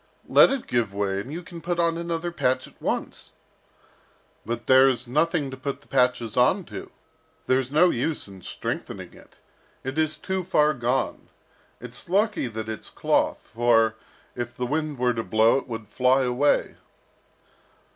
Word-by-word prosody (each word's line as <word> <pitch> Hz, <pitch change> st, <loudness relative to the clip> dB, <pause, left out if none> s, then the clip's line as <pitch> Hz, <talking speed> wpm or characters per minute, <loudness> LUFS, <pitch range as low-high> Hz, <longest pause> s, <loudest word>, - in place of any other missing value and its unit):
"Let -, -, +7 dB
it 270 Hz, -2 st, -2 dB
give 115 Hz, -5 st, -1 dB
way, 100 Hz, -1 st, -1 dB
and 125 Hz, +8 st, -7 dB
you 170 Hz, +3 st, -5 dB
can 170 Hz, -1 st, -10 dB
put 175 Hz, 0 st, -2 dB
on 170 Hz, -1 st, +2 dB
another 170 Hz, 0 st, -3 dB
patch 130 Hz, -6 st, 0 dB
at -, -, -19 dB
once." -, -, -4 dB, 1.1 s
"But 120 Hz, 0 st, -4 dB
there 130 Hz, +1 st, +7 dB
is 125 Hz, -1 st, -2 dB
nothing 150 Hz, +2 st, 0 dB
to 130 Hz, -, -7 dB
put 140 Hz, +1 st, -4 dB
the -, -, -23 dB
patches 125 Hz, -4 st, +1 dB
on 125 Hz, 0 st, +3 dB
to. -, -, -7 dB, 0.6 s
There's 130 Hz, 0 st, +1 dB
no 165 Hz, +5 st, +4 dB
use 145 Hz, +3 st, -2 dB
in 95 Hz, -1 st, -12 dB
strengthening -, -, -5 dB
it. -, -, -18 dB, 0.5 s
It 135 Hz, +4 st, -3 dB
is 155 Hz, -1 st, +2 dB
too 190 Hz, +3 st, -3 dB
far 150 Hz, -3 st, +3 dB
gone. 125 Hz, 0 st, -2 dB, 0.5 s
It's 125 Hz, +5 st, -8 dB
lucky 200 Hz, -, +1 dB
that 110 Hz, -1 st, -5 dB
it's 110 Hz, -1 st, -5 dB
cloth, -, -, 0 dB
for, 115 Hz, -1 st, +3 dB, 0.4 s
if 120 Hz, -1 st, -5 dB
the 125 Hz, -, -1 dB
wind 150 Hz, +2 st, -2 dB
were 125 Hz, 0 st, +2 dB
to 115 Hz, -1 st, -3 dB
blow, 110 Hz, +6 st, +3 dB
it -, -, -12 dB
would 110 Hz, -3 st, -6 dB
fly 125 Hz, +5 st, +3 dB
away." 125 Hz, +3 st, +1 dB
130 Hz, 165 wpm, -25 LUFS, 120-155 Hz, 1.1 s, Let